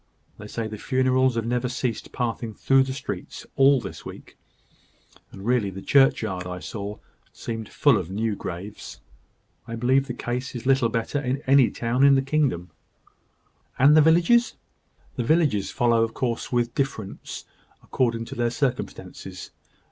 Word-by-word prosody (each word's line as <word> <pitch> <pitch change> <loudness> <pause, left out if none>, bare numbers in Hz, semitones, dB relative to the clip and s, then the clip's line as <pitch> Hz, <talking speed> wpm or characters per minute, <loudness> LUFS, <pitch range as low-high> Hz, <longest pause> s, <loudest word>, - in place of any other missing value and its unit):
They 105 - -8
say 115 +2 -4
the 110 -1 -6
funerals 130 0 +2
have 115 -1 -1
never 125 +1 -1
ceased 125 -2 -3
passing 115 -2 -3
through 135 0 +3
the 135 - -4
streets, 135 - -6
all 135 0 +5
this 115 - -8
week; - - -11 1.0
and 95 0 -10
really 120 -4 +2
the 95 0 -8
churchyard 110 -9 +2
I 90 0 -5
saw 100 +2 -6 0.3
seemed 115 -2 -6
full 140 -8 +3
of 90 -3 -6
new 105 +2 -1
graves. 95 +3 -7 0.7
I 115 - -5
believe 130 +4 +2
the 125 - -4
case 125 +2 -4
is 120 - -6
little 135 -3 +3
better 115 +5 -2
in 135 +1 -2
any 135 -2 +5
town 120 +3 0
in 140 0 +7
the 135 - +2
kingdom." 135 - 0 1.1
"And 135 +3 +6
in - - +7
the 155 - +7
villages?" 175 +10 +4 0.6
"The 120 - 0
villages 145 - +2
follow, 120 -3 +2
of 115 0 -1
course, 120 -3 -2
with 120 -1 0
differences 125 -8 -4 0.4
according 115 -3 -1
to - - -8
their 120 0 +1
circumstances. 125 0 -4
120 Hz, 160 wpm, -24 LUFS, 110-135 Hz, 1.1 s, in